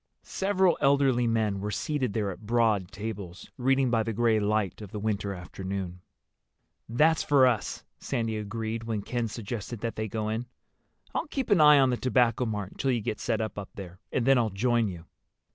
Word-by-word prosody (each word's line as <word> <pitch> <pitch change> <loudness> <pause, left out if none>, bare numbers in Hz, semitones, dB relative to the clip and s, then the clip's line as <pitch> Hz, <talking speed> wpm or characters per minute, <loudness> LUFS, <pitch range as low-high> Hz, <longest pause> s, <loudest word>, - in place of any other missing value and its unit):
Several 190 -3 +1
elderly 140 -4 +3
men 110 -3 +1
were 105 +2 -3
seated 130 - -1
there 105 -2 -1
at 100 +3 -11
broad 110 -5 +2
tables, 100 -4 -7
reading 135 0 +2
by 115 -2 +3
the 115 0 -2
gray 115 0 +3
light 105 -2 0
of 105 - -8
the 105 - -6
winter 105 -1 -1
afternoon. 95 0 -5 0.9
"That's 155 +7 +3
for 140 -3 +5
us," 120 -4 0 0.2
Sandy 115 -2 -2
agreed, 110 +2 -4
when 110 -3 -2
Ken 120 0 -2
suggested 115 0 -6
that 115 -1 -3
they 110 0 -2
go 110 +1 -3
in. 115 +3 -3 0.7
"I'll - - -2
keep 270 -5 -3
an 190 -6 +6
eye 150 -1 +8
on 135 -2 +4
the 125 - 0
Tobacco 125 -1 +2
Mart 105 -3 -3
until 135 - -2
you 125 -2 +2
get 105 - -3
set 115 -2 -1
up 105 -3 -5
there, 90 -2 -9
and 120 - 0
then 135 -1 +5
I'll 115 -2 +1
join 115 +3 +1
you." 85 -3 -7
115 Hz, 190 wpm, -28 LUFS, 105-125 Hz, 0.9 s, eye